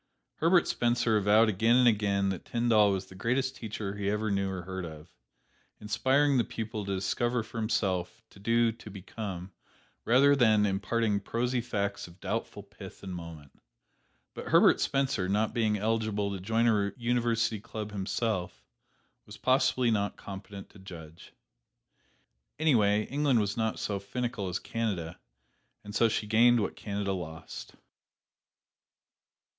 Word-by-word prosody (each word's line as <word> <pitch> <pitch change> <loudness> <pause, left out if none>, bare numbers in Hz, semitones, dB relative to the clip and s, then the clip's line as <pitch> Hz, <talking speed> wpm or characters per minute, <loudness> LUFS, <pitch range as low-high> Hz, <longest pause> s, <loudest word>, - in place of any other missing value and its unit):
Herbert 170 +2 +4
Spencer 120 -2 +1
avowed 105 +2 +4
again 110 +3 +3
and 125 -1 +5
again 100 -3 +2
that 95 -3 -4
Tyndall 115 -4 +3
was 95 -1 -2
the 95 - -14
greatest 130 +7 -1
teacher 110 -4 -5
he 100 -1 -1
ever 105 +1 -1
knew 100 -1 0
or 95 -2 -5
heard 95 +1 -5
of, 80 -1 -9 0.7
inspiring 130 +6 +2
the - - +3
pupil 110 -2 -5
to 100 0 -2
discover 120 +5 -1
for 115 +1 -7
himself, 95 -4 -1
to - - -16
do, 115 +2 +2
to 115 -1 -12
become, 95 -1 -7 0.5
rather 140 +4 +5
than 110 -5 +4
imparting 105 +2 0
prosy 120 +4 -1
facts 100 -5 -3
of 85 +2 -16
doubtful 100 0 -4
pith 100 -1 -12
and 95 -2 -6
moment. 85 -5 -10 0.7
But - - -8
Herbert - - +5
Spencer, 135 -9 0
not 105 +2 +1
being 110 -3 +1
eligible 110 -1 -1
to 100 - -4
join 115 +5 +1
a 100 -3 +2
university 115 -2 0
club 105 +1 -7
himself, 100 -1 -3 0.6
was 105 - -10
possibly 130 -2 +2
not 100 -2 -1
competent 100 0 -9
to 105 - -16
judge. 85 -4 -11 1.3
Anyway, 110 -9 +3
England 140 -3 +1
was 100 -2 -1
not 110 -1 -1
so 100 -2 -2
finical 105 0 -3
as 90 - -2
Canada, 95 -7 -3 0.6
and 105 0 -9
so 115 +1 +3
she 110 - -1
gained 115 +3 +5
what 100 - -2
Canada 100 -1 -3
lost. 80 -3 -7
105 Hz, 145 wpm, -29 LUFS, 95-115 Hz, 1.3 s, and